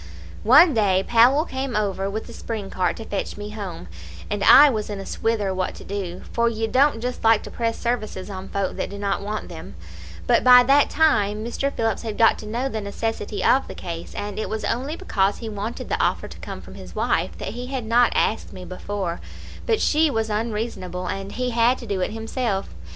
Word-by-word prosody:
"One 295 +8 +7
day 195 -4 +2
Powell 245 +7 +5
came 265 -5 -4
over 195 -2 -1
with 215 +2 -4
the - - -11
spring 215 -4 -5
cart 180 -2 0
to 225 - -7
fetch 205 -1 -4
me 205 0 -6
home, 195 - -7 0.4
and 205 -1 -1
I 290 +8 +9
was 215 -7 -1
in 205 -1 -4
a 195 - -7
swither 215 -4 -1
what 185 0 -2
to - - -11
do, 185 -3 -5
for 235 0 +2
ye 225 -1 -2
don't 265 +1 +3
just 250 +1 -4
like 225 -1 +4
to - - -9
press 230 -1 -2
services 215 -6 -3
on 195 -1 -7
folk 200 -1 -2
that - - -2
do 200 - -7
not 200 -1 -1
want 210 +1 -4
them; 160 - -10 0.5
but - - +3
by 250 0 +9
that 275 +3 +4
time 215 -9 +2
Mr. 275 +4 -2
Phillips 225 -5 -1
had 220 -3 -5
got 225 - +4
to 215 - -8
know 240 +5 -2
the 220 -5 -4
necessity 205 0 -3
of 270 - +3
the - - -8
case, 170 -2 -7
and 205 0 -4
it - - -3
was 220 0 -3
only 265 +7 -2
because 205 - 0
he 230 - -7
wanted 215 +2 -5
the - - -1
offer - - 0
to - - -12
come - - -7
from - - -12
his - - -11
wife - - 0
that - - -5
he 245 +1 -6
had 260 -3 -4
not 235 +2 +4
asked 220 - 0
me 185 -1 -9
before; 185 -1 -4 0.5
but 445 -2 +2
she 315 +1 +3
was 225 -4 -1
unreasonable, 210 -5 -3
and 195 +2 -4
he 250 0 -2
had 235 +2 +3
to 240 - -9
do 200 -4 -2
it - - 0
himself. 225 -2 -2
220 Hz, 220 wpm, -23 LUFS, 200-240 Hz, 0.5 s, I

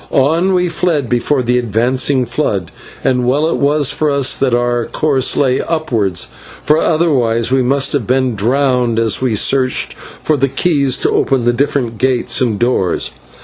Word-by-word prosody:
On 165 +8 +1
we 180 0 +1
fled 165 -6 -1
before 125 +2 0
the 125 +1 +1
advancing 125 +4 0
flood, 110 - -2 0.3
and 125 -1 +1
well 150 +5 +1
was 145 0 +1
it - - -9
for 155 - 0
us 140 -2 +1
that 130 -3 +1
our 120 -1 -1
course 140 -4 0
lay 130 -2 +1
upwards, 115 - -1 0.3
for 150 +1 +2
otherwise 130 -9 +1
we 130 0 +3
must 135 +2 +1
have 135 -7 -1
been 130 -1 +1
drowned 125 +2 0
as 115 -1 +1
we 125 -4 0
searched 130 +4 +1
for 155 - -4
the 135 0 +1
keys 140 -4 0
to - - 0
open 130 -3 0
the 120 - +2
different 130 -4 -2
gates 130 -1 0
and 115 -5 0
doors. 120 -6 -1
130 Hz, 170 wpm, -14 LUFS, 120-145 Hz, 0.3 s, we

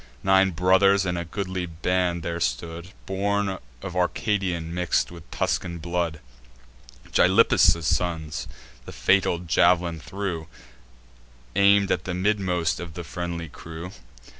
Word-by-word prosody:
Nine 95 0 +5
brothers 95 +3 +4
in 90 -1 -1
a 85 - -2
goodly 95 0 -4
band 90 +1 -1
there 85 0 -3
stood, 80 +6 -3 0.2
Born 100 0 -1 0.2
of 90 - -6
Arcadian 90 -3 -1
mix'd 90 -1 0
with 85 -2 -12
Tuscan 85 -2 -1
blood, 85 -1 -2 0.9
Gylippus' 85 - +5
sons: 80 -2 -1 0.4
the - - -7
fatal 95 -3 +2
jav'lin 85 0 +2
flew, 90 -3 -4 1.1
Aim'd 100 0 +4
at - - 0
the 90 - -3
midmost 90 -3 0
of 85 -2 -8
the 85 - -5
friendly 85 -1 -5
crew. 80 +3 -9
90 Hz, 120 wpm, -25 LUFS, 85-95 Hz, 1.1 s, Nine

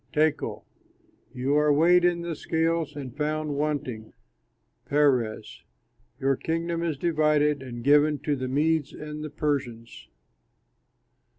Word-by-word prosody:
Tekel: 155 0 0 0.7
you 130 +3 -1
are 150 0 +3
weighed 175 +4 +5
in 175 -1 +2
the 170 -1 -4
scales 160 -1 -1
and 135 -4 -7
found 150 0 -2
wanting. 140 -7 -3 0.7
Peres: 125 -7 0 0.6
your 135 0 +2
kingdom 165 +3 -2
is 165 -4 -2
divided 150 -2 +2
and 120 -3 -8
given 145 +2 +4
to 150 - 0
the 130 -1 -4
Medes 150 +2 0
and 150 0 -7
Persians." 125 -6 -3
150 Hz, 115 wpm, -26 LUFS, 135-155 Hz, 0.7 s, weighed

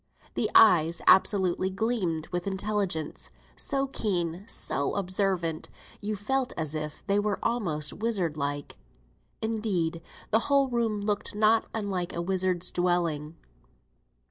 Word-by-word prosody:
The - - 0
eyes 170 -6 +6
absolutely 190 -1 +4
gleamed 190 -6 -1
with 175 +1 -3
intelligence; 190 -5 -2 0.3
so 275 -2 0
keen, 185 -8 -2
so 140 -8 -1
observant, 185 -4 0 0.3
you 210 +1 -2
felt 255 +6 -1
as 155 -2 -2
if 150 -1 -5
they 200 0 +2
were 205 -1 0
almost 165 -11 -1
wizard 195 -8 -1
like. 145 -1 -3 0.7
Indeed, 200 -7 -1 0.3
the 220 - +5
whole 275 -1 +4
room 230 -4 0
looked 205 0 -2
not 220 +1 +3
unlike 195 -5 -3
a 170 - -1
wizard's 185 -1 0
dwelling. 170 -4 0
190 Hz, 120 wpm, -28 LUFS, 170-215 Hz, 0.7 s, eyes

